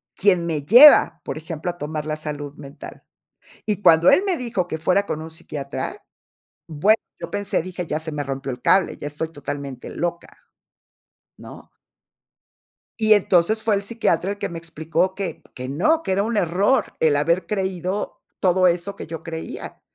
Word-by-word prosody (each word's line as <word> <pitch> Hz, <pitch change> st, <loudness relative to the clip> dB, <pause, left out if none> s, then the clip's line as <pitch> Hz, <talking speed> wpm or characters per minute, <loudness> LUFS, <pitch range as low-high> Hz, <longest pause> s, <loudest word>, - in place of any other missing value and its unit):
quien 185 Hz, -4 st, +2 dB
me 155 Hz, -3 st, -2 dB
lleva, 245 Hz, -, +8 dB
por -, -, -5 dB
ejemplo, 160 Hz, +2 st, -5 dB
a 175 Hz, -, -17 dB
tomar 150 Hz, -1 st, -4 dB
la 155 Hz, -, -1 dB
salud 145 Hz, -2 st, -6 dB
mental. 140 Hz, -1 st, -11 dB, 0.6 s
Y 205 Hz, -2 st, -1 dB
cuando 165 Hz, +1 st, +6 dB
él 375 Hz, -, +5 dB
me 370 Hz, -3 st, +1 dB
dijo 225 Hz, -, -2 dB
que -, -, -3 dB
fuera 185 Hz, +5 st, +1 dB
con 155 Hz, -, -4 dB
un 160 Hz, -, -8 dB
psiquiatra, 145 Hz, -3 st, -6 dB, 0.7 s
bueno, 200 Hz, +9 st, +3 dB, 0.2 s
yo -, -, -7 dB
pensé, 205 Hz, -3 st, -1 dB
dije: 180 Hz, -1 st, -6 dB
"Ya 155 Hz, -, -2 dB
se 160 Hz, 0 st, -5 dB
me 145 Hz, -1 st, -3 dB
rompió 135 Hz, 0 st, -4 dB
el 125 Hz, -1 st, -8 dB
cable, 190 Hz, -1 st, +3 dB
ya 145 Hz, -, -6 dB
estoy 160 Hz, +2 st, -4 dB
totalmente 140 Hz, -3 st, -6 dB
loca", 170 Hz, 0 st, -3 dB, 1.1 s
¿no? -, -, -13 dB, 1.3 s
Y 215 Hz, 0 st, +6 dB
entonces 205 Hz, +2 st, +2 dB
fue 215 Hz, -2 st, +2 dB
el 200 Hz, -, -2 dB
psiquiatra 200 Hz, -4 st, 0 dB
el -, -, -7 dB
que -, -, -3 dB
me 170 Hz, -, -6 dB
explicó 165 Hz, +2 st, -2 dB
que 195 Hz, -4 st, -4 dB
p 160 Hz, -, -26 dB
que 130 Hz, 0 st, -6 dB
no, 310 Hz, -, +2 dB
que 190 Hz, -, -2 dB
era 200 Hz, +1 st, +2 dB
un 225 Hz, +1 st, -2 dB
error 195 Hz, +8 st, +1 dB
el 155 Hz, -3 st, +3 dB
haber 170 Hz, +4 st, +1 dB
creído 190 Hz, 0 st, -3 dB, 0.2 s
todo 185 Hz, 0 st, +3 dB
eso 180 Hz, +3 st, 0 dB
que -, -, -8 dB
yo 165 Hz, 0 st, -7 dB
creía, 160 Hz, -1 st, -7 dB
170 Hz, 180 wpm, -22 LUFS, 155-200 Hz, 1.3 s, lleva